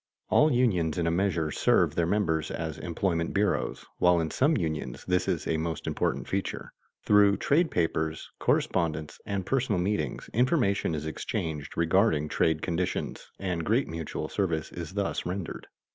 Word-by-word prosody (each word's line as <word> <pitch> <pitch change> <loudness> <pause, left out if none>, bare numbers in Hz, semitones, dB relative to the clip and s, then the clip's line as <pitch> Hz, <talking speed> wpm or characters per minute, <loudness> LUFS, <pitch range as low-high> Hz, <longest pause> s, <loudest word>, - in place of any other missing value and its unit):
All 155 +1 +5
unions 95 - +2
in 85 - 0
a 85 - +2
measure 85 -3 0
serve - - +3
their 85 -1 +1
members 80 -6 +1
as 80 -2 -4
employment 85 -1 -1
bureaus, 100 0 0
while 90 -1 +5
in 80 -1 -1
some 150 +4 +3
unions 80 -7 -3
this 90 0 +1
is - - -1
a 80 - 0
most 80 -1 -3
important - - -1
feature. 95 0 -3 0.3
Through 100 -1 +5
trade 155 +3 +2
papers, 80 -2 -1
correspondence, 80 -2 0
and 100 -2 -2
personal 125 -5 +1
meetings, 100 +4 -1
information 120 - +2
is 75 0 -4
exchanged 80 -1 -4
regarding 85 -2 +3
trade 80 0 +1
conditions, 90 +1 -2
and 90 -4 -2
great 115 - +2
mutual 80 -1 -4
service 85 -6 -1
is 85 +2 -7
thus 100 -1 -1
rendered. 90 -1 -5
85 Hz, 155 wpm, -28 LUFS, 80-100 Hz, 0.3 s, All